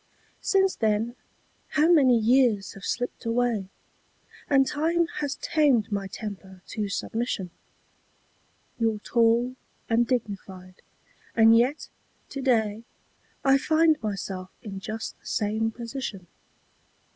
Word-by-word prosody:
Since 385 -1 +2
then 220 +2 0 0.6
how 305 +1 +5
many 265 -7 +6
years 230 -3 +3
have 195 - -13
slipped 245 +3 -3
away? 230 -4 0 0.8
And 270 -1 +5
time 330 +5 +1
has 285 -2 -2
tamed 285 -10 +2
my 200 -1 -2
temper 190 -2 -8
to 210 -2 -3
submission. 205 -3 -3 1.3
You're 225 -2 +1
tall 235 +3 +2 0.3
and 235 0 +2
dignified, 195 -6 -4 0.5
and 225 0 +7
yet 250 +6 +1 0.4
to 275 - -5
day 225 -4 +1 0.6
I 270 0 +5
find 315 +1 +3
myself 195 -3 -4
in 195 -4 -6
just 220 +3 -6
the - - -16
same 220 +2 0
position. 230 -4 -6
230 Hz, 110 wpm, -26 LUFS, 205-265 Hz, 1.3 s, and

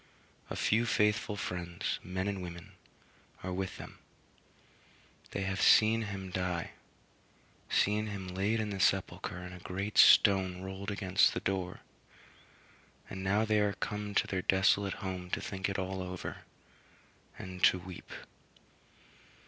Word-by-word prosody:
A - - -4
few 115 +2 +2
faithful 105 +1 +1
friends, 85 -3 -3
men 95 +1 -3
and 100 -2 -2
women, 85 -1 -8 0.7
are 95 0 -3
with 95 0 -3
them; - - -10 1.3
they 100 - -3
have 95 0 -2
seen 110 +1 +6
him 95 -3 -5
die 90 -2 -2 1.0
seen 105 +1 +2
him 100 -3 -5
laid 100 +5 0
in 105 -1 -2
the 100 - -4
sepulchre 95 0 0
and 90 0 -8
a 90 - -9
great 95 +4 -2
stone 95 -3 +6
rolled 95 +1 -5
against 100 -1 +2
the - - 0
door; 95 -2 -3 1.3
and 95 0 -5
now 100 +3 +2
they 110 -1 +2
are 105 -1 +2
come 105 0 -4
to - - +3
their 95 -1 -2
desolate 95 +1 +3
home 90 -1 -4
to - - -1
think 95 0 -3
it 100 - -2
all 95 0 -3
over, 90 -1 -6 0.9
and 90 -1 -8
to - - +5
weep. 90 0 -10
95 Hz, 140 wpm, -32 LUFS, 90-100 Hz, 1.3 s, seen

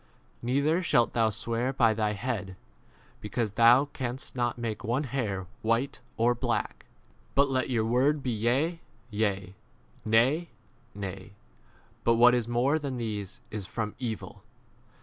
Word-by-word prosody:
Neither 140 +8 +1
shalt 120 -9 +2
thou 115 -2 +3
swear 115 +3 -2
by 115 -4 +3
thy 105 -1 0
head, 105 -3 -3 0.6
because 105 0 -2
thou 120 +6 +6
canst 130 -3 -5
not 120 -1 0
make 115 -3 -4
one 120 +6 0
hair 115 -9 -2
& - - -34
white 115 +5 0 0.2
or 120 +2 +4
black. 120 - -2 0.5
But 140 0 +4
let 130 0 0
your 115 -3 +1
word 135 +5 +2
be 125 - -1
Yea, 130 +10 +1 0.3
yea; 105 -3 -1 0.5
Nay, 130 +10 +3 0.5
nay; 100 0 -6 0.7
but 115 - +4
what 120 +1 +7
is 120 -2 +1
more 125 +6 +2
than 140 -4 -4
these 105 -1 -4
is 105 -3 -5
from 110 -1 -3
evil. 110 -4 -5
120 Hz, 145 wpm, -28 LUFS, 110-130 Hz, 0.7 s, what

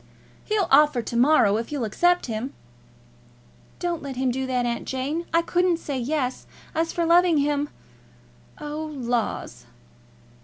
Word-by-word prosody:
"He'll 425 -4 +1
offer 280 -3 +5
to 235 - -6
morrow, 240 -5 +4
if 230 +4 -5
you'll 285 -4 -2
accept 350 +12 +2
him." 230 +3 -4 1.2
"Don't 345 -2 -2
let 275 -2 -6
him 260 0 0
do 260 +1 -2
that, 250 -1 0
Aunt 235 0 -2
Jane. 285 +6 -3
I 335 0 +3
couldn't 355 0 +2
say 285 -5 -4
Yes. 260 0 -2 0.3
As 325 +1 0
for 340 - -1
loving 340 0 +5
him; 290 0 0 0.9
oh, 300 +1 -5
laws!" 235 - -3
285 Hz, 145 wpm, -24 LUFS, 250-330 Hz, 1.2 s, offer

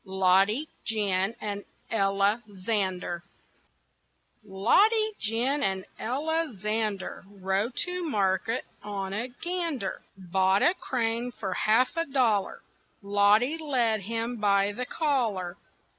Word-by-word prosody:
LODDY, 190 +8 +3 0.2
GIN, 205 -1 0
AND 205 -1 -4 0.3
ELLA 200 +1 +2
ZANDER 185 -3 -2 1.2
Loddy, 400 - +3
Gin, 240 +7 0
and 190 -6 -1
Ella 315 +6 -1
Zander 210 -1 -2
Rode 200 +4 -2
to 360 0 -3
market 200 +1 0 0.2
on 195 -2 -4
a 225 +5 -2
gander; 310 - -3 0.2
Bought 190 +1 +2
a 355 - +5
crane 240 -6 -2
for 195 -5 -4
half 230 - +2
a 330 0 0
dollar; 240 -8 +1 0.4
Loddy 205 +9 +3
led 245 -8 +1
him 230 +4 -3
by 200 -1 +3
the 250 +4 -5
collar. 220 - -1
215 Hz, 110 wpm, -28 LUFS, 195-250 Hz, 1.2 s, a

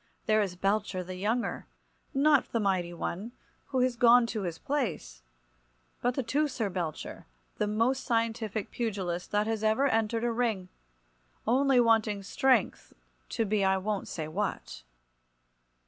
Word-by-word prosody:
There 215 0 +3
is 190 -3 -2
Belcher, 195 0 0
the 185 +1 -7
younger, 220 +6 -2 0.4
not 290 -1 +3
the 230 - 0
mighty 185 -4 0
one, 190 +6 -5 0.3
who 260 -2 0
is 255 -1 +2
gone 240 0 +6
to 215 - -2
his 170 -4 -3
place, 165 - -3 0.8
but 245 0 +1
the 270 - -1
Teucer 250 -4 0
Belcher, 170 -4 -5 0.3
the 210 - 0
most 230 +5 +1
scientific 225 -3 -1
pugilist 190 -7 -3
that 210 +1 +1
ever 220 +4 +1
entered 225 -2 +1
a 240 - +1
ring, 225 -6 -1 0.8
only 265 +2 +4
wanting 220 -3 +3
strength 260 +5 +1 0.4
to 225 - 0
be 205 -1 +1
I 190 0 +3
won't 205 +1 -2
say 155 -2 -4
what. 155 - -4
215 Hz, 140 wpm, -29 LUFS, 190-240 Hz, 0.8 s, gone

